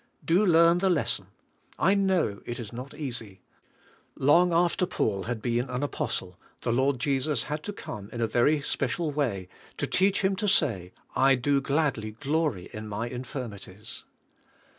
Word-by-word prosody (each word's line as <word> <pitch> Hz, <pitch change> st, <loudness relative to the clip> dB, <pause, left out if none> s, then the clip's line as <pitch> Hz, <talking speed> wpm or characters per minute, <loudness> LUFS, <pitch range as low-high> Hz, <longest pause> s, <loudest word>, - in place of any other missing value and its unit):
Do 175 Hz, +5 st, +4 dB
learn 170 Hz, -2 st, +5 dB
the 190 Hz, +1 st, +2 dB
lesson. 170 Hz, -5 st, 0 dB, 0.5 s
I 190 Hz, -, +4 dB
know 190 Hz, -, +1 dB
it 120 Hz, +1 st, -4 dB
is 115 Hz, -1 st, -7 dB
not 125 Hz, +3 st, -6 dB
eas}^ 120 Hz, -9 st, -5 dB, 0.8 s
Long 170 Hz, +6 st, +4 dB
after 175 Hz, +1 st, +2 dB
Paul 100 Hz, -, -1 dB
had 120 Hz, -2 st, -4 dB
been 120 Hz, +2 st, 0 dB
an 125 Hz, +2 st, -2 dB
apostle, 90 Hz, -9 st, -3 dB, 0.2 s
the 115 Hz, -, 0 dB
Lord 130 Hz, +2 st, +2 dB
Jesus 135 Hz, 0 st, 0 dB
had 150 Hz, +1 st, -4 dB
to 205 Hz, -, -3 dB
come 105 Hz, -, -8 dB
in 120 Hz, -, -7 dB
a 115 Hz, -, +2 dB
very 145 Hz, +7 st, +2 dB
special 150 Hz, +4 st, -1 dB
way 120 Hz, -11 st, -1 dB, 0.3 s
to -, -, -1 dB
teach 195 Hz, +2 st, +2 dB
him 190 Hz, 0 st, +2 dB
to 210 Hz, -, -1 dB
say, 105 Hz, -, +2 dB, 0.2 s
"I 135 Hz, 0 st, +5 dB
do 140 Hz, +3 st, +1 dB
gladly 135 Hz, -7 st, 0 dB
glor3' 140 Hz, -, -1 dB
in 110 Hz, 0 st, -7 dB
my 110 Hz, +3 st, -3 dB
infirmities." 115 Hz, -5 st, -7 dB
135 Hz, 160 wpm, -27 LUFS, 115-160 Hz, 0.8 s, learn